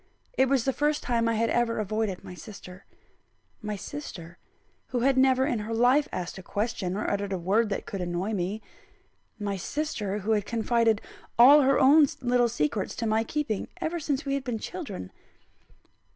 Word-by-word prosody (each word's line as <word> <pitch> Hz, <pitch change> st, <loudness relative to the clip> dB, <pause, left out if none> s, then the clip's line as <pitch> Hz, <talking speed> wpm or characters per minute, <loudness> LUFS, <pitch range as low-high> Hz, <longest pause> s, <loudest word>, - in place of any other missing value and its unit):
It 265 Hz, -, +2 dB
was 270 Hz, -4 st, +2 dB
the 270 Hz, -, +1 dB
first 295 Hz, +2 st, 0 dB
time 230 Hz, -2 st, +1 dB
I 230 Hz, -, +1 dB
had 230 Hz, +1 st, +1 dB
ever 240 Hz, -1 st, +1 dB
avoided 215 Hz, -2 st, -2 dB
my -, -, -9 dB
sister 185 Hz, -1 st, -11 dB, 0.8 s
my 210 Hz, -1 st, -3 dB
sister, 195 Hz, -, -8 dB, 0.5 s
who 245 Hz, -, -2 dB
had 270 Hz, +2 st, +3 dB
never 260 Hz, 0 st, +4 dB
in 240 Hz, -4 st, 0 dB
her 220 Hz, +2 st, -3 dB
life 255 Hz, +5 st, +4 dB
asked 180 Hz, +1 st, -5 dB
a -, -, -8 dB
question, 200 Hz, -1 st, -2 dB
or 215 Hz, -, -2 dB
uttered 200 Hz, 0 st, -1 dB
a 190 Hz, -, 0 dB
word 205 Hz, +6 st, +1 dB
that 200 Hz, -, -3 dB
could 195 Hz, -, -5 dB
annoy 180 Hz, +4 st, -2 dB
me; 200 Hz, +3 st, -2 dB, 0.7 s
my 205 Hz, -2 st, -3 dB
sister, 210 Hz, -, -3 dB
who 210 Hz, +2 st, -2 dB
had 210 Hz, -2 st, +1 dB
confided 230 Hz, -1 st, +1 dB, 0.4 s
all 275 Hz, +5 st, +9 dB
her 275 Hz, 0 st, +3 dB
own 285 Hz, +3 st, +7 dB
little 245 Hz, -1 st, +2 dB
secrets 190 Hz, -1 st, -1 dB
to 230 Hz, -, -3 dB
my 220 Hz, 0 st, +2 dB
keeping, 230 Hz, -4 st, -2 dB
ever 340 Hz, 0 st, -2 dB
since 290 Hz, -1 st, -2 dB
we 275 Hz, -, -1 dB
had 275 Hz, -1 st, -1 dB
been 245 Hz, -4 st, -2 dB
children. 250 Hz, -, -6 dB
225 Hz, 180 wpm, -27 LUFS, 200-265 Hz, 0.8 s, all